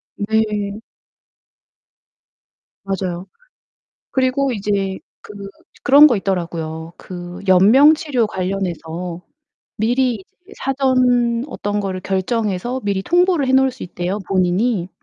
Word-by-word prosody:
네. 210 0 -1 2.0
맞아요. 190 -2 -4 0.8
그리고 265 0 +1
이제 195 -2 -2 0.2
그 - - -11 0.5
그런 290 +3 +8
거 245 - +3
있더라고요. 170 -4 -3
그 175 0 -9
연명 225 - +7
치료 280 -7 -1
관련해서 180 -3 -4 0.5
미리 245 +3 +1
이제 360 - -15
사전 255 -3 +1
어떤 205 -7 -3
거를 190 -2 -3
결정해서 210 +5 -2
미리 195 -1 -1
통보를 350 - +2
해 260 - +1
놓을 265 0 +4
수 255 - -12
있대요, 180 +3 -3
본인이. 185 +1 +1
205 Hz, 225 characters per minute, -19 LUFS, 185-255 Hz, 2.0 s, 그런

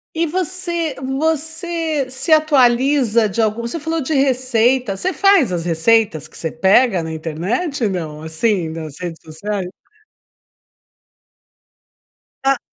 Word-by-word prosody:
E 330 +1 +1
você 340 -2 -2
você 320 +2 -1
se 265 +4 -2
atualiza 260 -6 +3
de 230 +4 -1
alguma 220 +2 -1
você 285 +8 -4
falou 320 +1 -2
de 300 +3 -2
receita, 255 -4 +1
você 375 - -1
faz 390 - +4
as 175 -2 -2
receitas 175 0 +2
que - - -19
você 160 - -3
pega 190 +1 +3
na 160 0 -5
internet, 205 - -2
não? 160 -5 -5
Assim, 160 0 -1
das 155 -3 -7
redes 170 -2 -6
sociais? 185 +4 -5 2.7
Ah. 270 -1 +2
245 Hz, 125 wpm, -18 LUFS, 185-305 Hz, 2.7 s, faz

